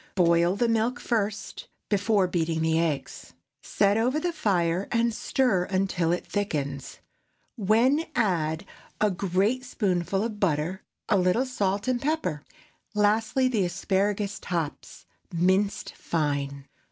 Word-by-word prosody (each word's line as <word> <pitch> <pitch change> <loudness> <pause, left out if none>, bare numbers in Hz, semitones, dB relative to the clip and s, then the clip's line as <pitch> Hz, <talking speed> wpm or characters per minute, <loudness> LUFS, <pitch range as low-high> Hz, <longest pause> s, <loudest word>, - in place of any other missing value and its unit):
Boil 170 0 +3
the 235 +3 +1
milk 230 +2 +1
first, 215 -3 -2 0.2
before 205 -1 +2
beating 170 -2 -1
in 160 - 0
the 160 0 +2
eggs; 160 -4 -3 0.3
set 200 +1 +2
over 250 +6 +1
the 345 +2 -2
fire 180 - 0
and 235 0 +2
stir 215 -6 +1
until 185 -3 0
it 175 - -1
thickens, 145 -9 -3 0.6
when 240 - +3
add 170 -7 0 0.3
a 210 -1 +3
great 195 +7 0
spoonful 195 -5 -1
of 220 -2 -4
butter, 175 +1 0 0.3
a 200 - +3
little 185 +8 +2
salt 205 -4 -1
and 250 -2 +1
pepper; 275 - -1 0.5
lastly, 220 +5 +2
the 225 -6 +1
asparagus 195 +3 -1
tops, 165 -4 -4 0.3
minced 190 +4 +1
fine. 140 -3 -2
195 Hz, 130 wpm, -26 LUFS, 170-225 Hz, 0.6 s, Boil